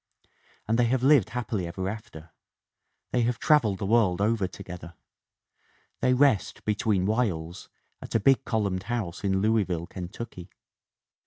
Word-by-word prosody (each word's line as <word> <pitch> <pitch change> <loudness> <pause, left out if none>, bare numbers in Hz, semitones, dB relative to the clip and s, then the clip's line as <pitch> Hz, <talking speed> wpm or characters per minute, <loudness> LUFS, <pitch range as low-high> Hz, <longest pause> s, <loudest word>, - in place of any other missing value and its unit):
And 115 +2 +1
they 120 - +4
have 125 +1 0
lived 135 -6 +5
happily 110 -7 -3
ever 95 +2 -4
after. 90 -6 -8 0.8
They 125 - +2
have 120 0 0
traveled 120 -11 +3
the 100 - -4
world 100 -4 +3
over 105 -1 +1
to 100 - -11
gether. 85 -2 -9 1.0
They 125 - +3
rest, 130 -6 +2
between 105 -3 +1
whiles, 95 -7 -2 0.3
at - - -8
a - - +5
big, 135 +5 +4
columned 100 -6 -1
house 105 -8 -3
in 95 -1 +1
Louisville, 100 -6 +1
Kentucky. 90 +1 -8
105 Hz, 145 wpm, -27 LUFS, 90-120 Hz, 1.0 s, lived